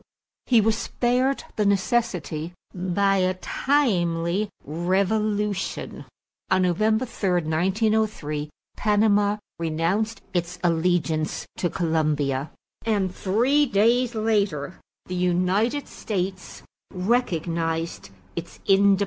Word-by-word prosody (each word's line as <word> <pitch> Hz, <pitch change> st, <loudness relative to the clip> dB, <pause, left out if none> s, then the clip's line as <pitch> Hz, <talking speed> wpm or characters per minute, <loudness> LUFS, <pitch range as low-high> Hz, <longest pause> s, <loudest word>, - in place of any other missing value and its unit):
He 235 Hz, -3 st, +5 dB
was 220 Hz, +1 st, +2 dB
spared 255 Hz, +3 st, 0 dB
the 210 Hz, -, +2 dB
necessity 190 Hz, -, 0 dB, 0.2 s
by 195 Hz, +2 st, +1 dB
a 185 Hz, 0 st, +1 dB
timely 185 Hz, -, +1 dB, 0.2 s
revolution. 200 Hz, +5 st, -1 dB, 0.4 s
On 185 Hz, 0 st, +3 dB
November 215 Hz, +7 st, +2 dB
3, 200 Hz, -5 st, -2 dB
1903, 180 Hz, -2 st, 0 dB, 0.3 s
Panama 205 Hz, -1 st, +3 dB, 0.2 s
renounced 170 Hz, +8 st, -1 dB
its 175 Hz, 0 st, -1 dB
allegiance 165 Hz, -2 st, +1 dB
to 175 Hz, -, 0 dB
Colombia 150 Hz, -5 st, 0 dB, 0.3 s
and 200 Hz, -5 st, 0 dB
three 250 Hz, +11 st, +2 dB
days 235 Hz, +3 st, +2 dB
later 205 Hz, -7 st, 0 dB, 0.3 s
the 185 Hz, -, -6 dB
United 185 Hz, +9 st, +1 dB
States 190 Hz, -2 st, -4 dB, 0.3 s
recognized 170 Hz, -, -1 dB, 0.3 s
its 170 Hz, 0 st, -7 dB
independence. 195 Hz, 0 st, +5 dB
190 Hz, 90 wpm, -24 LUFS, 170-215 Hz, 0.4 s, He